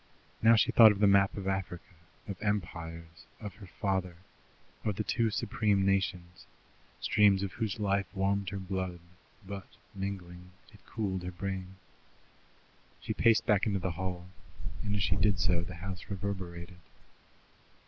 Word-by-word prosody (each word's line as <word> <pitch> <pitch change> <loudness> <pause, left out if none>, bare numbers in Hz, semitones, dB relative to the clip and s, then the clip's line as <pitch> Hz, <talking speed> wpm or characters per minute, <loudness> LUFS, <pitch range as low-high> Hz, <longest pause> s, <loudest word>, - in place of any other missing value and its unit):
Now 115 +1 +7
she 110 - +3
thought 110 -2 +9
of 105 - -2
the 105 - +5
map 100 0 +4
of 95 -1 -4
Africa; 90 -3 -3 0.3
of 100 -3 -6
empires; 85 -4 -4
of 105 -4 -7
her 100 - -11
father; 95 -2 -2 0.7
of 105 -2 -1
the 110 - -1
two 115 +1 +1
supreme 105 -2 +1
nations, 95 -3 -1 0.5
streams 100 -2 +4
of 100 - -2
whose 110 0 -3
life 100 -2 +1
warmed 100 0 +1
her 100 - -4
blood, 95 -2 -3 0.5
but, 100 0 -7 0.3
mingling, 90 -2 -6 0.2
had 105 - -19
cooled 95 -5 -2
her 90 - -4
brain. 95 0 -5 1.2
She - - -3
paced 115 -2 +4
back 105 0 +3
into 100 -2 +1
the 95 -1 -2
hall, 90 +1 -4 0.6
and 105 -1 -1
as 100 - +1
she 90 - +1
did 100 -1 +3
so 90 -1 +2
the 85 +1 -7
house 95 +1 -6
reverberated. 90 -3 -5
95 Hz, 150 wpm, -31 LUFS, 90-100 Hz, 1.2 s, thought